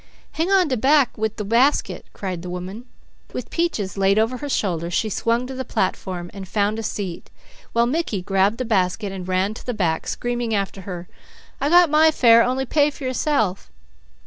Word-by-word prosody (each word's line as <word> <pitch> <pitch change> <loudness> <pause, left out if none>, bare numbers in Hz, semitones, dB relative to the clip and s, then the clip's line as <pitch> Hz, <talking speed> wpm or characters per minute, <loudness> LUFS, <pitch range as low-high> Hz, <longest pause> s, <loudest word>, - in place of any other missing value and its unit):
"Hang 325 +4 -1
on 385 -3 +4
de 260 -3 0
back 275 +2 +3
wid 220 0 -2
the 210 - -3
basket," 240 +7 +1
cried 185 -4 -5
the 180 - -7
woman. 185 +6 -6 0.5
With - - -6
Peaches 220 - -1
laid 195 +1 +3
over 225 +4 +1
her 290 +2 -6
shoulder, 170 - -1
she 215 +5 0
swung 230 +5 0
to 265 - -7
the 260 0 -4
platform, 185 -5 -3
and 195 -1 -8
found 210 +3 0
a - - -2
seat, 200 -5 -5 0.4
while 235 0 +3
Mickey 245 - -1
grabbed 195 +3 +2
the 255 - -3
basket 200 -1 0
and 185 -2 -7
ran 185 +3 0
to - - -10
the 245 - -3
back 165 -6 -1
screaming 240 -2 -2
after 195 -1 -2
her: 175 -1 -6 0.5
"I 285 - +1
got 350 -1 +6
my 310 +1 +6
fare; 235 -6 +6
only 255 +2 0
pay 290 +2 +3
for 285 - -11
yourself." 255 -7 0
220 Hz, 195 wpm, -22 LUFS, 190-260 Hz, 0.5 s, got